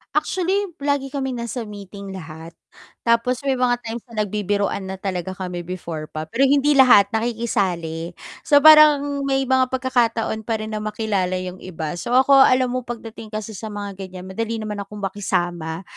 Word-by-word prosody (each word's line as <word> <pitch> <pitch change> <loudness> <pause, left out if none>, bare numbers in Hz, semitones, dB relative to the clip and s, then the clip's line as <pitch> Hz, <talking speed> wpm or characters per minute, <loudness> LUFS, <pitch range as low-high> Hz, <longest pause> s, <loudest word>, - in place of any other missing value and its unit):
Actually, 380 +1 0
lagi 280 -1 -1
kaming 265 -4 -3
nasa 235 0 -5
meeting 200 -1 -9
lahat. 160 -1 -10 0.5
Tapos 235 +2 +2
may 270 -2 0
mga 250 -1 +3
times 230 +1 -4
na 220 -3 -2
nagbibiruan 200 -1 -1
na 190 - -4
talaga 185 -1 -4
kami 180 -2 -5
before 170 -3 -6
pa. 155 0 -5
Pero 250 +11 +1
hindi 285 +1 +3
lahat 255 -8 +6
nakikisali. 190 -8 -2 0.3
So 290 -3 +4
parang 295 -2 +7
may 270 0 +1
mga 260 0 +2
pagkakataon 235 -4 0
pa 225 - +1
rin 215 - -6
na 215 - -3
makilala 210 -3 -1
'yong 185 0 -5
iba. 170 -1 -5
So 245 - -1
ako 260 +2 +4 0.2
alam 255 -1 +2
mo, 255 - -1
pagdating 225 -2 -7
kasi 215 0 -6
sa 220 +1 -7
mga 205 -2 -6
ganiyan 185 -1 -10
madali 225 +3 -2
naman 215 -2 -4
akong 205 +1 -10
makisama. 175 -4 -2
215 Hz, 170 wpm, -21 LUFS, 185-255 Hz, 0.5 s, parang